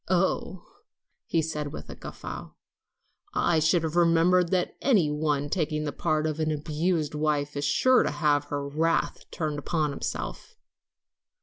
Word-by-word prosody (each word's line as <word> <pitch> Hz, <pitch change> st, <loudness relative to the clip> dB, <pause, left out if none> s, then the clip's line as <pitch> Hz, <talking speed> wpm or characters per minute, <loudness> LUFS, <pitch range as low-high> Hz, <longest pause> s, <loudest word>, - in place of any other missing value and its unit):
"Oh," 185 Hz, 0 st, 0 dB, 0.6 s
he 165 Hz, -, +1 dB
said, 150 Hz, -2 st, -3 dB
with -, -, -8 dB
a -, -, -9 dB
loud -, -, -17 dB
guffaw, -, -, -7 dB, 0.9 s
"I 170 Hz, -2 st, +3 dB
should 160 Hz, +2 st, +3 dB
have 160 Hz, 0 st, -2 dB
remembered 170 Hz, +1 st, +4 dB
that 180 Hz, -1 st, 0 dB
any 200 Hz, -, +3 dB
one 150 Hz, -1 st, 0 dB
taking 155 Hz, -1 st, -1 dB
the 150 Hz, -, -2 dB
part 155 Hz, 0 st, 0 dB
of 155 Hz, 0 st, -2 dB
an 155 Hz, 0 st, +1 dB
abused 155 Hz, +1 st, -1 dB
wife 150 Hz, -1 st, 0 dB
is 145 Hz, 0 st, -1 dB
sure 255 Hz, -, +4 dB
to -, -, +1 dB
have 145 Hz, -3 st, +1 dB
her 145 Hz, -1 st, -3 dB
wrath 160 Hz, +4 st, 0 dB
turned 150 Hz, -3 st, -3 dB
upon 155 Hz, 0 st, -1 dB
himself." 140 Hz, -, -5 dB
155 Hz, 160 wpm, -27 LUFS, 150-170 Hz, 0.9 s, remembered